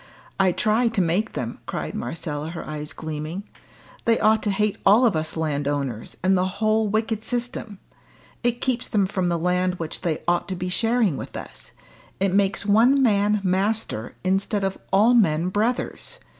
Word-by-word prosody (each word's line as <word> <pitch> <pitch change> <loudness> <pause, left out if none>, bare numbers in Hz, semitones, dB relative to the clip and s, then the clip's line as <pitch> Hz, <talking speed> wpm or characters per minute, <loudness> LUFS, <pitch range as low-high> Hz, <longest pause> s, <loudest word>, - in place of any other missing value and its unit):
I 190 -1 +4
try 220 +6 +2
to 225 -3 -1
make 185 +5 +1
them," 120 -1 -4
cried - - -4
Marcella, 150 +3 -4
her 165 0 -7
eyes 150 0 -5
gleaming. 155 +4 -5 0.6
"They 230 -1 +3
ought 220 0 +4
to 210 - -1
hate 210 +1 0
all 215 +6 +6
of 225 - +3
us 155 +1 -3
landowners, 145 -6 -2
and 190 +1 +4
the 185 0 +2
whole 215 0 +2
wicked 220 +1 0
system. 240 -3 -3 0.6
It 240 0 0
keeps 255 -2 0
them 205 -3 +2
from 185 -2 -1
the 170 - +1
land 180 +2 +1
which 165 -2 -5
they 165 -4 -2
ought 175 0 +1
to 190 - -3
be 180 0 -3
sharing 225 - +1
with - - -7
us; - - -9 0.5
it 195 -1 +1
makes 195 0 +1
one 235 +7 +5
man 210 -2 +3
master, 190 - -1
instead 195 +2 0
of 195 0 0 0.2
all 210 +5 +5
men 175 -7 +3
brothers. 220 +6 -2
195 Hz, 170 wpm, -24 LUFS, 165-220 Hz, 0.6 s, all